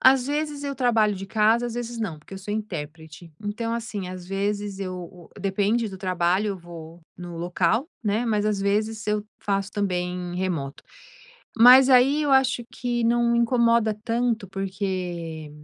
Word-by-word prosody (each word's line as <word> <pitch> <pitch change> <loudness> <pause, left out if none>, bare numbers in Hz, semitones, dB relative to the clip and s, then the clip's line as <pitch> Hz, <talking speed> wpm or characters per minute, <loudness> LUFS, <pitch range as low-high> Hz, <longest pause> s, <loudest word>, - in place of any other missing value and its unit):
Às 260 -1 +5
vezes 295 0 -2
eu 280 -1 -3
trabalho 225 -5 +2
de 195 0 -7
casa, 220 +4 +3
às 235 - -5
vezes, 240 -1 -5
não. 190 -9 -3
Porque 150 - -12
eu - - -7
sou 205 +2 -6
intérprete. 160 -5 -7
Então, 220 +3 -3
assim, 220 -5 -4
às 180 -1 -8
vezes 200 +1 -2
eu 185 -2 -4
o 180 -1 -10
depende 205 +4 +1
do 190 -1 -9
trabalho 185 +2 +1
eu 195 -2 -3
vou 170 -1 -11 0.2
no 175 -1 -8
local, 180 - 0 0.2
né, 215 +3 +1
mas, 210 -2 +1
às 210 -2 0
vezes 215 +2 -1
eu 210 0 0 0.2
faço 195 0 -1
também 180 -3 -2
remoto. 165 -7 -3 0.7
Mas 255 +3 +9
aí 265 +4 +5
eu 290 - 0
acho 265 -2 +3
que 240 -1 -2
não 235 0 +3
me 235 - +3
incomoda 235 -2 +3
tanto 235 -2 0
porque 185 -5 -4
205 Hz, 170 wpm, -24 LUFS, 180-235 Hz, 0.7 s, Mas